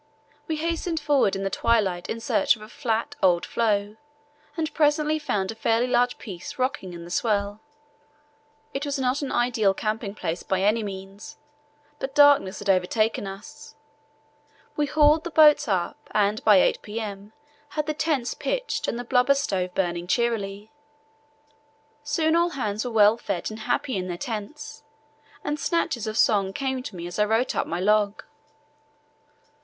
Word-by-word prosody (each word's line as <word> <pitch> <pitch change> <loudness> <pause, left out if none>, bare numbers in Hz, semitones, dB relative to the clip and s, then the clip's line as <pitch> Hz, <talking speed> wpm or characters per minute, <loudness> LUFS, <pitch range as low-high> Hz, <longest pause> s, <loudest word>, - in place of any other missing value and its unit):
We 320 - -1
hastened 330 +1 -2
forward 285 -9 +2
in 195 - -3
the 195 - -2
twilight 200 -7 +1
in 230 - -3
search 285 +4 +2
of 215 - -13
a - - -10
flat, 230 -4 -2
old 175 -2 +3
floe, 210 -2 0 0.6
and 320 -1 -2
presently 305 0 +2
found 200 -10 -1
a - - -6
fairly 225 +1 +1
large 245 0 +1
piece 200 +6 -8
rocking 255 -8 -2
in 170 -1 -8
the 170 - -10
swell. 205 0 -1 1.1
It 275 - -3
was 285 -1 -2
not 260 +1 0
an 280 - -3
ideal 230 -5 +2
camping 215 -1 -3
place 170 -3 -3
by 190 0 -1
any 215 +3 +3
means, 195 0 -8 0.6
but 265 0 -5
darkness 285 -10 +5
had 205 - -7
overtaken 200 +3 +1
us. 195 +2 -10 1.0
We 295 -1 0
hauled 300 +2 +4
the 345 - -4
boats 300 -3 +6
up, 185 -5 -1 0.2
and 210 +1 +1
by 210 - +6
8 - - +2
p.m. 210 -1 -6 0.4
had 300 0 -2
the 305 - -1
tents 295 -5 -1
pitched - - -2
and - - -2
the 245 - -4
blubber 250 +2 +3
stove 185 -9 -2
burning 175 -2 -1
cheerily. 210 -2 -1 1.3
Soon 315 +2 +1
all 340 +1 +3
hands 215 -8 -3
were 250 - -3
well 215 -1 +5
fed 180 -3 -3
and 215 - -8
happy 255 +1 0
in 185 -1 -3
their 175 -1 -4
tents, 220 - -6 0.6
and 295 +1 -2
snatches 305 - -1
of 215 0 -3
song 195 -4 +3
came 265 +1 -2
to 220 -6 -8
me 170 -1 -6
as 175 +3 -6
I 210 - +4
wrote 225 +4 0
up - - -1
my 170 - -3
log. 210 +1 +1
225 Hz, 165 wpm, -25 LUFS, 200-280 Hz, 1.3 s, boats